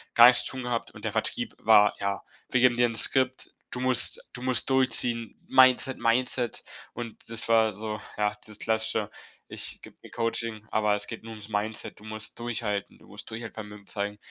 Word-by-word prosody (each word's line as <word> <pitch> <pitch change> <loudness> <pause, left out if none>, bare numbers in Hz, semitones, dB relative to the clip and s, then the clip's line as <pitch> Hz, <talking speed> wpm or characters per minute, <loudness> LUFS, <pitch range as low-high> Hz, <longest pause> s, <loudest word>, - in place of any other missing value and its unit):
gar 120 - +9
nichts 125 - +9
zu - - +3
tun 130 - -5
gehabt 120 -1 -3
und - - -11
der - - -1
Vertrieb - - -1
war: 105 0 +5
„Ja, 100 0 -3 0.3
wir 130 - +1
geben 125 -1 +4
dir 120 0 +4
'n 115 - -5
Skript. 130 +2 +2 0.2
Du 125 - -3
musst 130 -1 +2
du 125 - -8
musst 130 -1 +1
durchziehen. 120 -3 +1
Mindset, 130 +1 +4
Mindset.“ 120 +1 0 0.3
Und 115 -2 -9
das 115 -1 0
war 110 -1 +4
so, 105 +1 -6 0.2
ja, 105 -1 0
dieses 105 -1 -7
Klassische: 110 -1 0 0.4
„Ich - - 0
gebe - - -12
dir - - -13
Coaching, 115 -2 -3
aber 105 -1 +1
es 105 0 -1
geht 115 - -8
nur 115 - -10
ums 105 -1 -9
Mindset. 105 +1 -4
Du - - -17
musst 110 +1 -5
durchhalten, 110 -4 -2
du - - -21
musst - - -8
Durchhaltevermögen 110 -2 -9
zeigen“, 100 +2 -4
115 Hz, 195 wpm, -26 LUFS, 105-120 Hz, 0.4 s, gar